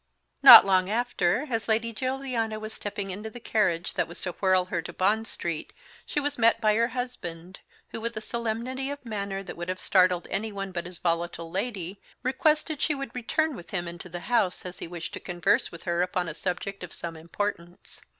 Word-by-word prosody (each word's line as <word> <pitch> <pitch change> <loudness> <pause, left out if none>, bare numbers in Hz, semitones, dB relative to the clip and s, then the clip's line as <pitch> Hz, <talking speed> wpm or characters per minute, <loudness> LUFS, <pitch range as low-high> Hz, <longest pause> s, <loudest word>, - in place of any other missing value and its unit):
Not - - +12
long 185 -1 +3
after, 225 0 +1
as 225 -1 -1
Lady 230 +1 +1
Juliana 255 -3 -2
was 215 0 -6
stepping 200 -1 -5
into 210 +4 -5
the 245 - -10
carriage 185 -7 0
that - - 0
was 170 - -10
to 180 - -2
whirl 185 0 +2
her 175 -2 -2
to - - -7
Bond 215 +4 +1
Street 165 -3 -4 0.3
she - - 0
was 290 -2 -3
met 230 0 +5
by 215 -1 +3
her 230 +2 +3
husband, 195 -8 -6 0.3
who, 225 - -6
with 230 0 -3
a - - 0
solemnity 235 +4 -3
of 285 -2 -6
manner 200 -3 -3
that 185 - -8
would 175 +1 -5
have 185 0 -2
startled 180 -2 +3
anyone 200 -2 -2
but 175 -1 -4
his 180 -1 -10
volatile 170 -1 -2
lady, 195 -2 -3 0.2
requested 305 +3 +1
she 305 - +1
would 275 -3 -6
return 295 +5 0
with 175 - -10
him 175 -4 -2
into 170 +1 -8
the 175 0 -6
house, 215 -7 +1
as 180 0 -7
he - - -5
wished 170 -1 -6
to - - -5
converse 175 -1 +1
with 170 - -10
her 170 -1 0
upon 180 -1 0
a 165 - -4
subject 185 +3 -4
of 175 - -8
some 170 -1 -6
importance. 170 +1 -5
200 Hz, 205 wpm, -27 LUFS, 175-230 Hz, 0.3 s, Not